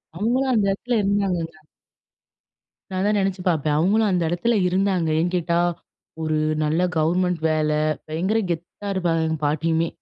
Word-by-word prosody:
அவுங்களும் 250 +7 +1
அந்த 210 -3 +2
இடத்தில 240 +4 -1
இருந்தாங்கல்ல. 185 -5 -1 1.3
நான் 185 -1 -3
அதான் 210 +1 +2
நினைச்சு 190 -1 -1
பார்ப்பேன். 155 -2 +1
அவுங்களும் 210 +5 +3
அந்த 180 -2 +1
இடத்துல 220 +7 +1
இருந்தாங்க. 185 -3 +1
ஏன் 175 +1 -1
கேட்டா, 170 0 +1 0.6
ஒரு 155 -1 0 0.3
நல்ல 155 +4 +1 0.2
கவர்மெண்ட் 175 +2 +1
வேலை. 155 -1 +1 0.3
பயங்கர 185 +8 0
கெத்தா 175 +4 -5
இருப்பாங்க 165 -3 0
எங்க 160 0 -1
பாட்டியுமே! 160 +2 +1
175 Hz, 140 wpm, -23 LUFS, 160-200 Hz, 1.3 s, அவுங்களும்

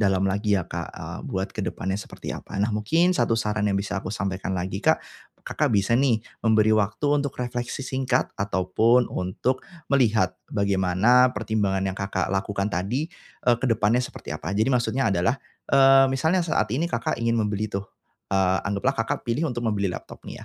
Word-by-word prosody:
dalam 95 -2 +2
lagi 100 +2 +1
ya, 90 - -3
Kak, - - -5
eee, - - -7
buat 95 +1 -3
ke - - -3
depannya 95 +1 -2
seperti - - -7
apa. - - -8
Nah, 105 +3 +1
mungkin 165 - +2
satu 115 -9 +2
saran 105 -2 0
yang 100 - +1
bisa 100 0 -3
aku - - -5
sampaikan 95 -2 -3
lagi, 95 +2 -3
Kak, - - +4 0.4
Kakak 110 - 0
bisa 100 +2 +2
nih 120 -6 +2 0.2
memberi 110 -1 +3
waktu 110 +2 +1 0.2
untuk 140 -1 -2
refleksi 120 +1 -4
singkat 130 0 0
ataupun 105 +5 +2
untuk 95 +8 -1 0.3
melihat 110 -9 +2
bagaimana 100 +5 +3
pertimbangan 105 -3 0
yang 95 -1 -2
Kakak 95 -2 -2
lakukan 100 +1 -1
tadi, 120 - -2 0.3
eee, 120 -1 +4
ke - - 0
depannya 115 +1 +2
seperti - - -7
apa. 90 - -5
Jadi 110 +5 +2
maksudnya 125 -1 +1
adalah, 95 +9 +1 0.3
eee, 135 0 +7
misalnya 160 +8 +1
saat 110 -10 0
ini 155 +7 0
Kakak 120 -7 -2
ingin 115 0 +1
membeli 105 -1 0
tuh, 100 -1 -3 0.5
eee, 95 -1 +3
anggaplah 100 +7 0
Kakak - - -2
pilih 130 +7 0
untuk 120 -1 -3
membeli 100 -3 0
laptop - - -9
nih - - -9
110 Hz, 180 wpm, -25 LUFS, 95-125 Hz, 0.5 s, eee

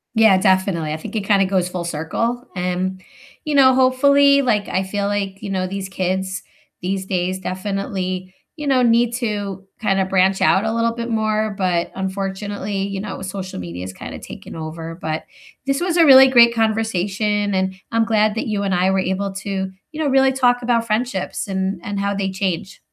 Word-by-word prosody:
Yeah, 220 -4 +6
definitely, 185 -5 +1
I - - -3
think 160 - -8
it 205 - -2
kinda 195 -2 +3
goes 185 -2 0
full 180 -1 -4
circle, 200 - -2
um, 180 +1 -2 0.5
you 300 - -1
know, 260 -2 +7
hopefully 280 +2 +5
like, 215 -6 +1
I 190 - 0
feel 200 +1 -2
like, 200 -1 -3
you 210 - -5
know, 185 -1 -1
these 195 0 -5
kids 190 +1 -2 0.4
these 190 +1 -2
days 185 -1 -1
definitely, 185 -1 -4 0.2
you 300 - -5
know, 260 -2 +3
need 235 0 +3
to 205 -5 -3 0.2
kinda 195 -3 +1
branch 190 0 +2
out 200 +3 +3
a 220 - 0
little 230 0 +1
bit 235 0 -4
more, 215 -1 0
but 180 -3 0
unfortunately, 195 +1 -3
you 195 -1 -4
know, 195 -1 -6
social 190 - -6
media's 90 +1 -6
kinda - - -8
taken - - -10
over, 165 +1 -6
but 155 -1 -3 0.4
this 275 0 +1
was 355 -1 0
a 335 - +6
really 265 -2 +9
great 235 -2 +6
conversation, 210 -2 0
and 190 0 0 0.2
I'm 230 0 +2
glad 215 -1 +2
that 225 - -2
you 210 -2 -1
and 195 -2 0
I 180 +1 +2
were 190 0 +2
able 190 +1 -2
to, 195 -1 -3 0.2
you 310 - -8
know, - - +1
really 270 -1 +4
talk 245 -2 +2
about 235 -1 +1
friendships 215 -3 -2
and 190 0 -2
and 205 -3 -4
how 200 0 -1
they 195 -1 -1
change. 190 -1 -3
195 Hz, 190 wpm, -20 LUFS, 190-225 Hz, 0.5 s, really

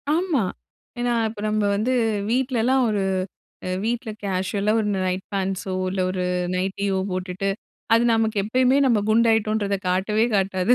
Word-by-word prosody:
ஆமா. 335 - +1 0.6
ஏன்னா, 240 0 +1 0.2
இப்போ 215 -1 -9
நம்ம 215 0 0
வந்து 215 +5 0 0.4
வீட்லலாம் 255 +1 +2
ஒரு, 205 -2 0 0.6
அ - - -3 0.2
வீட்ல 235 0 -2
கேஷுவலா 200 +2 0
ஒரு 215 - -1 0.2
நைட் 185 +1 -2
பேண்ட்ஸோ 190 -1 -2 0.2
இல்ல 190 0 -1
ஒரு 185 -1 -2 0.3
நைட்டியோ 190 +1 -1
போட்டுட்டு 185 +2 -2 0.4
அது 230 +1 +5
நமக்கு 220 -1 +1
எப்பயுமே 255 +5 +3
நம்ம 240 -4 +4
குண்டாயிட்டோம்ன்றத 220 -2 +2
காட்டவே 210 +5 +1
காட்டாது. 195 +2 +2
210 Hz, 135 wpm, -23 LUFS, 190-230 Hz, 0.6 s, அது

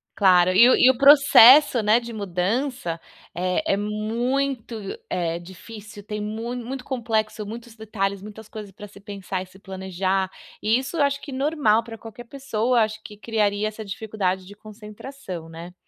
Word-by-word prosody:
Claro. 185 -2 +4
E 230 +6 +7
o - - +5
e 255 - +5
o 260 - +2
processo, 280 -2 +7
né, 215 +3 +3
de 235 0 -9
mudança, 200 - -2 0.4
é 180 +1 -2 0.2
é - - 0
muito, 230 +4 -2 0.3
eh, 170 -1 -2
difícil, 205 +3 -12
tem 210 0 -6
mui 225 +3 -5
muito 250 +2 -6
complexo, 220 -4 -2
muitos 230 +2 -9
detalhes, 200 -3 -3
muitas 215 +1 -11
coisas 210 -2 -9
para 205 +2 -11
se 200 0 -16
pensar 195 -2 -6
e - - -7
se 185 +1 -19
planejar, 190 0 -2 0.3
e 220 +3 +2
isso 270 +6 -5
eu 290 - +3
acho 280 0 0
que 285 - -9
normal 265 -5 +1
para 225 -1 -10
qualquer 225 +2 -11
pessoa, 245 -3 -1
acho 215 0 -2
que 210 - -11
criaria 210 -1 -1
essa 215 +1 -7
dificuldade 195 -3 -3
de 205 +2 -13
concentração, 210 -3 -10
né. 170 +2 -10
215 Hz, 170 wpm, -23 LUFS, 195-240 Hz, 0.4 s, E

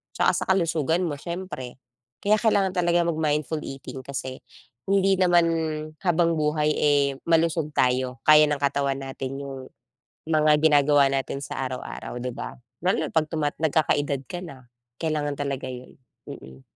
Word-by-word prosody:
tsaka - - +3
sa - - -2
kalusugan 165 -2 +1
mo 155 -4 -2
siyempre. 170 -7 -6 0.5
Kaya 210 +1 +4
kailangan 200 -4 +2
talaga 175 -1 +2
mag-mindful 155 -1 0
eating 135 0 -7
kasi 130 -1 -5 0.5
hindi 195 0 +3
naman 175 -2 +4 0.6
habang 170 -1 +2
buhay, 150 0 +1
eh, 145 -1 +3 0.2
malusog 165 -1 +2
tayo, 125 0 +1
kaya 155 0 +8
ng 150 - 0
katawan 140 -1 0
natin 135 0 -5
yung 135 -2 -8 0.6
mga 155 -1 +4
ginagawa 145 -2 +5
natin 135 0 -2
sa - - -5
araw-araw, 130 -1 -6
di 125 +1 -3
ba? - - -7 0.3
Lalo 185 - +1
na - - -7
'pag 160 -1 +2
tumat 150 -3 -1
nagkakaedad 145 -3 +1
ka 175 - -5
na, 135 -7 -11 0.3
kailangan 150 -3 -1
talaga 140 -2 -3
yun. 125 0 -10 0.3
Mm. 65 0 -11
150 Hz, 145 wpm, -25 LUFS, 135-165 Hz, 0.6 s, kaya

